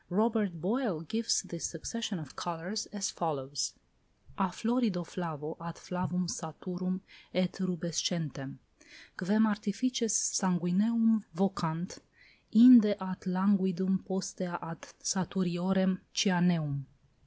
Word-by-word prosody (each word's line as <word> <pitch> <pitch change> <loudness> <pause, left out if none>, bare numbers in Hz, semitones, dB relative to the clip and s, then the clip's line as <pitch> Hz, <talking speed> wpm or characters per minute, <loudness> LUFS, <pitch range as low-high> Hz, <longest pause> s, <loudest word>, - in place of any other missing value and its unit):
Robert 210 -3 +1
Boyle 205 - -1
gives 220 +8 0
this 170 -1 -7
succession 210 +5 -4
of 155 -5 -9
colours 175 +5 -4
as 205 -2 -3
follows: 145 -4 -2 0.6
"A 195 - +1
florido 220 -2 0
flavo 160 -3 -5
ad 170 0 -6
flavum 180 0 -3
saturum 185 +3 -4 0.3
et 185 -1 +2
rubescentem 170 -6 -2 0.6
(quem 210 +4 +3
artifices 220 +2 0
sanguineum 210 +4 +2
vocant) 180 -3 -1 0.5
inde 225 -2 +9
ad 185 -1 -5
languidum, 190 0 +2
postea 185 -2 -3
ad 165 0 -7 0.2
saturiorem 190 0 +1 0.2
cyaneum." 175 -7 +2
185 Hz, 95 wpm, -31 LUFS, 170-205 Hz, 0.6 s, inde